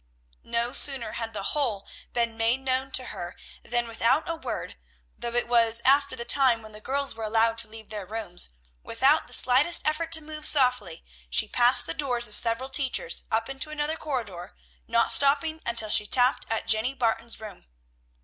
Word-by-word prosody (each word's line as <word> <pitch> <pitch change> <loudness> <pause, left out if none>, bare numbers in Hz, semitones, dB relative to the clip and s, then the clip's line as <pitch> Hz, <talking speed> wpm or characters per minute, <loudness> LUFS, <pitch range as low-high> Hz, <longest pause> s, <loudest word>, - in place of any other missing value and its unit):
No 235 +1 +2
sooner 270 -2 +1
had 225 -1 -5
the 205 -3 -6
whole 240 -10 -2 0.2
been 235 -1 -1
made 230 +3 0
known 265 0 -2
to 255 - +3
her, 175 0 -7 0.3
than 240 0 -2
without 235 +8 0
a 335 - -2
word, 320 - -6 0.4
though 235 0 -6
it 240 - +1
was 230 -1 +3
after 280 +1 +3
the 235 - -6
time 255 -5 +3
when 215 - -13
the 210 0 -11
girls 275 +3 -2
were 225 0 -8
allowed 225 +1 +1
to 230 - +2
leave 220 0 -12
their 205 -3 -7
rooms, 210 - -3 0.3
without 270 +7 +1
the - - -9
slightest 280 +7 +3
effort 320 +2 -2
to 320 - +5
move 305 0 -2
softly, 250 - +1 0.2
she - - +4
passed 245 +1 +3
the - - -4
doors 250 -5 0
of 210 - -2
several 235 +4 +2
teachers, 275 - 0
up 225 +1 -1
into 270 +2 -4
another 305 +1 -3
corridor, 230 - -6 0.3
not - - +2
stopping 300 +3 +2
until 230 -2 0
she 210 0 +4
tapped 250 +3 +2
at 225 0 -2
Jenny 220 +4 +2
Barton's 235 -2 -2
room. 210 - -12
240 Hz, 185 wpm, -26 LUFS, 225-275 Hz, 0.4 s, to